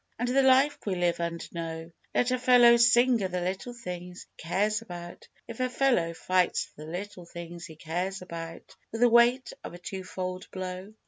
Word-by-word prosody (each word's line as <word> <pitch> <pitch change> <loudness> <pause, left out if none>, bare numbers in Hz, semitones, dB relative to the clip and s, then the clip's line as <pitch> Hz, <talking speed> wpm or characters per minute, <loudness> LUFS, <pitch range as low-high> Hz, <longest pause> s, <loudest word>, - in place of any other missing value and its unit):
And 245 - -1
the 265 +2 +3
life 265 +2 +4
we 195 -3 -1
live 175 -1 0
and 170 0 -3
know, 165 -1 -5 0.2
Let 250 0 +2
a 255 - +1
fellow 245 -1 +7
sing 240 0 +5
o' - - +1
the 180 0 -3
little 190 +7 -4
things 180 -5 -7 0.2
he - - -9
cares 210 +5 +1
about, 175 -5 -9 0.2
If 230 0 -9
a 255 0 +1
fellow 245 -11 +1
fights 180 +2 +1
for 150 - -13
the 160 - -8
little 180 -1 -7
things 170 0 -8
he 160 - -12
cares 180 +5 -3
about 165 -2 -8 0.2
With 225 - -5
the 245 - +6
weight 240 +2 +4
of - - -7
a - - -8
two 190 +2 -6
fold 185 0 -5
blow! 185 +2 -6
185 Hz, 200 wpm, -28 LUFS, 175-235 Hz, 0.2 s, fellow